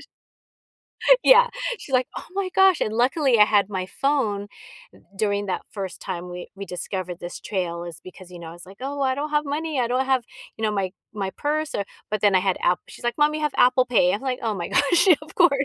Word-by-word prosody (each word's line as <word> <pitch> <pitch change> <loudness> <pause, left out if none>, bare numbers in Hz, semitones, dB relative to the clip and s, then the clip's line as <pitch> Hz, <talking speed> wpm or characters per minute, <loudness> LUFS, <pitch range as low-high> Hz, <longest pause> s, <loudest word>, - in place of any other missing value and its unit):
sh - - -14 1.2
Yeah, - - +7 0.3
she's 270 - -10
like, 255 0 +2
"Oh - - -6
my 390 -1 -1
gosh" 385 -3 +5
and, 215 - -1
luckily 255 +1 +2
I 210 - +9
had 205 -1 +2
my 185 -2 -3
phone 210 -5 -1 0.7
during 205 0 0
that 185 - -2
first 195 -3 -6
time 180 -1 -5
we 180 0 -8
we 200 - -7
discovered 180 -1 -5
this 175 - -7
trail 175 -4 -3
is 170 -3 -9
because, 185 0 -13
you 175 - -10
know, 165 -1 -9
it's, 175 - -11
like, 195 +1 -14
"Oh, 280 +2 -4
I 260 -1 +2
don't 295 +3 -4
have 300 0 +1
money, 300 0 -2
I 240 - +1
don't 255 +2 0
have" 260 -3 +2 0.3
you 220 - -8
know, 215 - +2
"my 190 -2 -2 0.2
my 195 -2 -3
purse, 305 +6 -2
or" 200 - -1 0.3
but, 215 -2 -1
then 205 -2 +3
I 185 - +5
had 190 -1 0
App 175 0 +2
she's - - -12
like, 240 +4 -1
"Mom, 300 +1 +3
you 310 - -3
have 300 -2 0
Apple 255 +1 +4
Pay." 195 -7 +3
I'm 205 - -2
like, 260 -2 -2
"Oh 220 -2 -1
my 175 -3 -4
gosh, 345 +6 +3
of 305 - -13
course." 350 -2 +5
220 Hz, 235 wpm, -23 LUFS, 190-280 Hz, 1.2 s, I